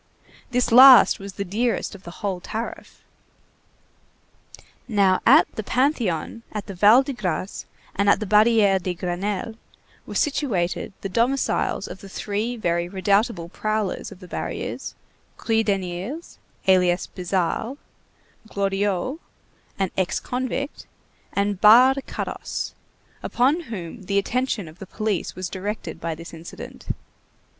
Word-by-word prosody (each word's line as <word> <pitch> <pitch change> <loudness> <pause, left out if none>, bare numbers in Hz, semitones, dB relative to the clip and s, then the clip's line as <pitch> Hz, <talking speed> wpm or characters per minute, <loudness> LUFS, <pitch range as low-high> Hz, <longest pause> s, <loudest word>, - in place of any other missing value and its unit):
This 250 -1 0
last 255 -1 +9
was 195 0 -8
the 200 - -4
dearest 225 +7 -1
of 200 - -11
the - - -7 0.2
whole 190 -3 -1
tariff. 225 +6 -7 1.8
Now, 195 -4 +3
at - - +8
the - - -2
Panthéon, 230 - 0
at 210 -2 -5
the 200 - -7
Val 210 +8 +6
de 275 0 -4
Grâce, 190 -4 -3 0.3
and 200 +1 +2
at - - +5
the 215 - -3
Barrière 210 -2 +4
de 180 0 -3
Grenelle 195 +5 -3 0.5
were - - -7
situated 220 - 0
the - - -3
domiciles 240 +7 0
of - - -9
the 195 - -11
three 215 +5 -3
very 170 -4 -1
redoubtable 195 -1 +1
prowlers 215 0 -2
of 185 - -13
the 180 - -10
barriers, - - -5 0.4
Kruideniers, 210 - -2 0.3
alias 180 -1 +4
Bizarro, 185 +7 -2 0.7
Glorieux, 200 - -1 0.6
an 195 -2 -1
ex 185 -2 0
convict, 260 +3 -4 0.4
and 200 -1 -1
Barre 255 +6 +7
Carosse, - - -4 0.5
upon 270 +7 +2
whom 195 0 -6
the 200 +1 -1
attention 235 -2 -1
of 155 +3 -14
the 195 - -9
police 215 -2 -2
was 185 0 -4
directed 200 +4 -5
by 165 -1 -2
this 165 +2 -10
incident. 165 +1 -10
200 Hz, 130 wpm, -23 LUFS, 185-230 Hz, 1.8 s, last